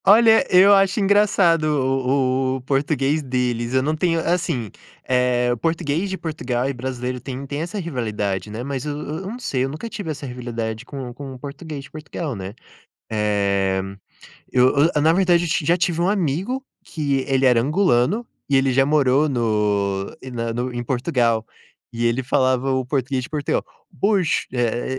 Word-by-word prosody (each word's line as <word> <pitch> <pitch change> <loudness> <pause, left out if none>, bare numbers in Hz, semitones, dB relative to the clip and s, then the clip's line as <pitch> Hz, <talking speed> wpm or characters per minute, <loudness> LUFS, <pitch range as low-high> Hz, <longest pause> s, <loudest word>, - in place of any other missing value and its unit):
Olha, 225 +4 +6
eu 190 +2 +7
acho 195 +1 +3
engraçado 195 -5 +3
o 135 -2 +1 0.2
o 130 - -5
português 140 +2 0
deles, 125 -2 -1
eu 130 - +3
não 155 +3 0
tenho 165 +1 +1
assim, 160 - -1 0.4
eh, 125 -1 +2
português 165 +3 -1
de 190 - -3
Portugal 130 -7 -2
e 140 - -1
brasileiro 125 0 -4
têm 135 0 -6
têm 145 +2 -4
essa 175 +6 -4
rivalidade, 110 - -3
né, 110 +3 -5
mas 135 -1 -4
eu 145 -1 -3
eu 150 +3 -5
não 230 +5 -5
sei, 130 - -1
eu 135 - -1
nunca 155 +11 -6
tive 205 -6 -6
essa 150 -2 -5
rivalidade 120 -2 -5
com 130 -3 -7
com 135 +1 -8
o 130 - -11
português 145 +1 -7
de 145 - -14
Portugal 155 -2 -5
né. 95 0 -6 0.6
Eh, 100 -3 +1 0.7
eu 125 0 +5 0.3
eu 150 - +3
na 160 +2 +5
verdade 175 -2 +3
eu - - -3
ti 155 -1 0
já 170 - +4
tive 175 -2 0
um 175 +2 +2
amigo 195 - -1 0.2
que 140 -4 -1
ele 135 -1 +2
era 125 -2 +4
angolano 150 - +2 0.2
e 140 - +1
ele 135 0 +3
já 135 +1 +3
morou 145 0 +3
no 105 -6 0
em 130 - -8
na 115 -1 -3
no 125 +2 -2
em 120 0 -4
Portugal 120 -3 +1 0.5
e 120 0 -2
ele 120 +2 +1
falava 130 0 +1
o 130 -1 0
português 130 0 -1
de - - -8
Portugal: 150 -2 -1 0.4
"Pois", 195 -5 +2
eh 120 +1 -1
135 Hz, 180 wpm, -22 LUFS, 120-160 Hz, 0.7 s, eu